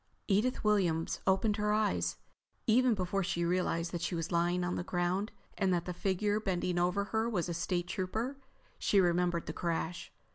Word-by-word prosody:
Edith 215 +5 +1
Williams 180 -7 +1
opened 205 +2 +3
her 210 0 +1
eyes. 90 - +1 0.5
Even 245 +1 +4
before 190 +1 -1
she 170 -1 -1
realized 170 -1 0
that 175 - -3
she 175 +1 -1
was 165 0 -3
lying 175 +1 +1
on 175 0 -1
the - - -2
ground 180 +4 -1 0.3
and 190 -2 +2
that 175 -1 +1
the 180 - -3
figure 205 +3 0
bending 180 -3 -1
over 180 +3 +1
her 220 +1 +1
was 180 -7 -1
a 175 - -2
State 175 +1 -1
Trooper, 210 +8 -2 0.4
she 200 - +3
remembered 175 -1 +2
the 155 - -4
crash. 170 0 -3
180 Hz, 180 wpm, -32 LUFS, 175-205 Hz, 0.5 s, Even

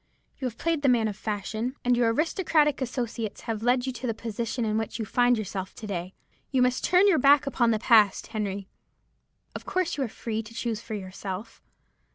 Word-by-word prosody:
You 260 - -1
have 230 -2 -7
played 330 -3 0
the 280 - +3
man 235 -3 +3
of 210 - -4
fashion, 215 +4 -3
and 245 0 +4
your 235 -1 +3
aristocratic 305 - +2
associates 235 -4 -3
have 225 -2 -4
led 245 +2 +2
you 260 - -2
to 250 +1 -5
the 230 - -1
position 230 +1 -3
in 215 -1 0
which 220 0 -2
you 225 - -3
find 245 +2 +3
yourself 195 -2 -5
to 220 - -8
day. 185 -2 -4 0.3
You 260 -2 +3
must 250 0 +1
turn 365 +3 +5
your 370 -6 +4
back 280 +2 +6
upon 250 -4 +2
the 220 - +3
past, 215 -3 +4
Henry. 200 -3 -4 0.9
Of - - -8
course 365 -4 0
you 275 - 0
are - - -1
free 220 0 -4
to 225 +1 -13
choose 230 -2 -2
for 220 -2 -6
yourself. 190 +2 -7
230 Hz, 205 wpm, -27 LUFS, 215-260 Hz, 0.9 s, back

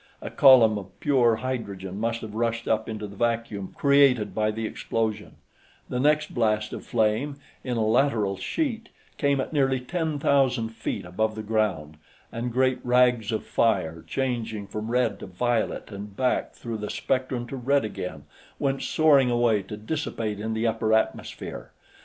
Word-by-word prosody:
A - - -7
column 120 -7 +6
of 95 -1 -13
pure 125 -6 +3
hydrogen 100 -6 -4
must 115 +1 -1
have 110 -2 -7
rushed 115 +1 -1
up 110 0 0
into 110 -1 -4
the 100 0 -10
vacuum 115 -3 -2
created 140 -6 +4
by 110 0 +1
the 110 +1 -3
explosion; 110 -1 -3 0.5
the 125 - -2
next 150 +3 +2
blast 110 -2 0
of - - -6
flame, 115 +5 0 0.3
in 125 -2 -2
a 110 - +1
lateral 110 -4 +2
sheet, 230 - -2 0.3
came 140 -1 +2
at 130 - -3
nearly 135 -3 +2
ten 160 +3 -2
thousand 130 -5 +2
feet 115 - -4
above 110 +5 -1
the 110 - -5
ground, 100 -9 -1 0.3
and 120 +1 -3
great 130 +1 +2
rags 125 -3 +3
of 110 - -2
fire, 85 -8 0
changing 115 -5 -2
from 105 +2 -5
red 120 -3 +1
to - - -8
violet 110 +5 -1
and 100 0 -8
back 130 -1 0
through 115 -2 -5
the 105 - -4
spectrum 130 -2 -1
to 130 - -7
red 135 +1 +1
again, 85 -8 -6 0.3
went 135 -1 -1
soaring 145 -5 +4
away 120 -3 +2
to 100 +2 -8
dissipate 110 -4 -3
in 110 +1 -3
the 110 +1 -1
upper 110 -1 +2
atmosphere. 110 - -3
115 Hz, 165 wpm, -26 LUFS, 105-130 Hz, 0.5 s, column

